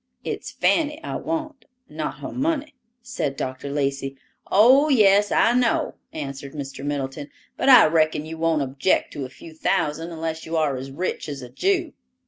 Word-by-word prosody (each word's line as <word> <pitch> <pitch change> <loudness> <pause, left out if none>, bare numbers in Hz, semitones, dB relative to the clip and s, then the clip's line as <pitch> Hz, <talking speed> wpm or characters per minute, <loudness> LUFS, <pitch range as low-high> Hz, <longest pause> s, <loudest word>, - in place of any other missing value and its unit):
"It's - - -4
Fanny 300 -2 +1
I - - -4
want, 310 -3 -4 0.2
not 155 0 -5
her - - -5
money," 295 +1 -1 0.3
said 140 -10 -3
Dr. 130 +2 -4
Lacey. 140 -1 -2 0.3
"Oh, 260 +9 +6
yes, 205 -5 +5
I 230 - +4
know," 245 -2 +1 0.2
answered 140 -2 -6
Mr. 135 -2 -6
Middleton; 145 0 -4 0.3
"but - - +1
I 250 -3 +9
reckon 155 -1 +2
you 160 0 -7
won't 165 -3 +2
object 135 +7 0
to 140 - -4
a - - -8
few 160 +5 -13
thousand, 160 +1 -1
unless 160 0 -4
you 165 +1 -3
are 150 -4 +1
as 130 +1 -6
rich 165 +2 -3
as 140 -3 -6
a 125 - -9
Jew." 350 - 0
160 Hz, 170 wpm, -23 LUFS, -, 0.3 s, I